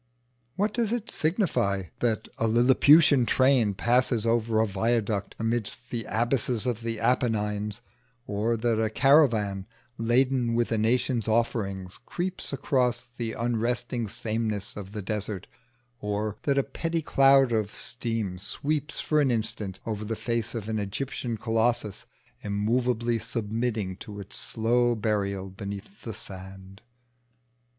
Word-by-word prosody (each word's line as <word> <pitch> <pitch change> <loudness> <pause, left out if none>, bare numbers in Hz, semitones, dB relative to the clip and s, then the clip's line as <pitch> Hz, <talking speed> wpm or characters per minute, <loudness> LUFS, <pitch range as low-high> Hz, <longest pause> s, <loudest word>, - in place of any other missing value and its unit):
What 205 +2 0
does 230 -3 0
it 240 -2 -2
signify 155 - +1 0.2
that 110 -2 0
a 115 - +2
lilliputian 130 +4 +6
train 130 -6 +3
passes 120 +1 +2
over 115 -1 +2
a 110 - +4
viaduct 105 0 -1
amidst 115 -1 -2
the 115 -3 -3
abysses 120 0 0
of 120 -3 -1
the 115 -1 -3
Apennines, 105 -4 0 0.4
or 110 +3 0
that 115 -1 +1
a 110 - +1
caravan 110 -8 +3 0.3
laden 120 +1 +2
with 120 0 +1
a 115 - +2
nation's 120 +1 +1
offerings 100 -5 -1
creeps 185 +1 -3
across 130 -3 0
the 115 -2 -3
unresting 120 0 -1
sameness 110 -1 -3
of 100 -1 -8
the 105 -2 -4
desert, 105 -1 -3 0.5
or 105 0 -2
that 140 -1 +2
a 140 - +4
petty 165 +2 -3
cloud 135 -3 +5
of 110 -2 0
steam 115 -6 -2
sweeps 150 - -2
for 155 -1 +2
an 140 - +3
instant 110 -4 -1
over 110 -2 -3
the 110 +1 -3
face 115 +1 -2
of 110 -3 -4
an 110 -1 -1
Egyptian 115 +3 -3
colossus 115 -1 0 0.4
immovably 115 +3 0
submitting 110 -3 -2
to 105 -1 -9
its 100 0 -7
slow 120 +2 +2
burial 100 -3 -1
beneath 100 - -8
the 115 - -6
sand? 95 0 -8
115 Hz, 135 wpm, -27 LUFS, 105-125 Hz, 0.5 s, lilliputian